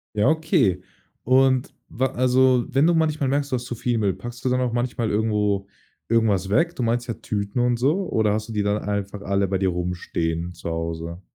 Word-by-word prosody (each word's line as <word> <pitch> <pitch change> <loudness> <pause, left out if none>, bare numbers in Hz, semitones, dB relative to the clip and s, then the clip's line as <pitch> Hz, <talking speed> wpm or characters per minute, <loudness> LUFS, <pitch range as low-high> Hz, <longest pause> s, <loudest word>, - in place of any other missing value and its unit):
Ja, 105 0 +3
okay, 155 - +2 0.4
und 130 0 +3
wa 130 +3 0
also 130 0 +3
wenn 135 +4 +2
du 170 - +4
manchmal 155 -4 +1
merkst, 140 +1 0
du 130 - +2
hast 120 - -3
zu 120 - -5
viel 120 0 -1
Müll, 100 -3 +1
packst 120 +4 -9
du 130 - +1
dann 125 0 +1
auch 125 -2 -1
manchmal 120 -2 -1
irgendwo 105 -2 0 0.4
irgendwas 105 -5 +2
weg? 165 +12 +2
Du 125 - -2
meinst 120 +2 0
ja 115 - -2
Tüten 105 +2 -3
und 120 -1 +2
so 155 +10 +1
oder 105 -2 +2
hast 110 +1 -3
du - - -5
die 105 - 0
dann 100 +1 +1
einfach 100 0 -3
alle 100 0 0
bei 95 0 0
dir 95 -1 +1
rumstehen 85 -1 -3
zu 85 - -6
Hause? 85 +1 -4
115 Hz, 210 wpm, -23 LUFS, 100-130 Hz, 0.4 s, du